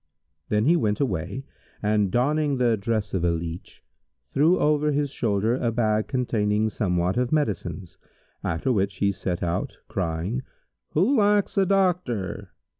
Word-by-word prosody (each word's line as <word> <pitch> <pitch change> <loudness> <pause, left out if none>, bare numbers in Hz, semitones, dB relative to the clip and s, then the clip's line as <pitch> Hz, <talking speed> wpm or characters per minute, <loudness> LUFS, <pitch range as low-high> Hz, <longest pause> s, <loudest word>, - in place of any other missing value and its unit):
Then 105 +1 +2
he 165 +5 +5
went 105 -11 +1
away 100 - -2 0.4
and, 105 -1 +1
donning 145 +5 +1
the 120 -2 +3
dress 110 0 -2
of 95 -3 0
a 85 - +3
leach, 85 +1 -5 0.5
threw 160 +6 +4
over 150 0 +2
his 145 -1 0
shoulder 110 -3 0
a 120 -2 0
bag 110 -2 +1
containing 110 -5 0
somewhat 90 -3 0
of 125 0 0
medicines, 95 - -2 0.4
after 85 +10 -1
which 100 -2 0
he 100 +1 +1
set 95 -2 -3
out, 85 0 -2
crying, 90 +7 -2 0.5
'Who 200 - +3
lacks 205 -1 +3
a 195 -2 +3
doctor?' 180 - 0
110 Hz, 145 wpm, -25 LUFS, 95-145 Hz, 0.5 s, he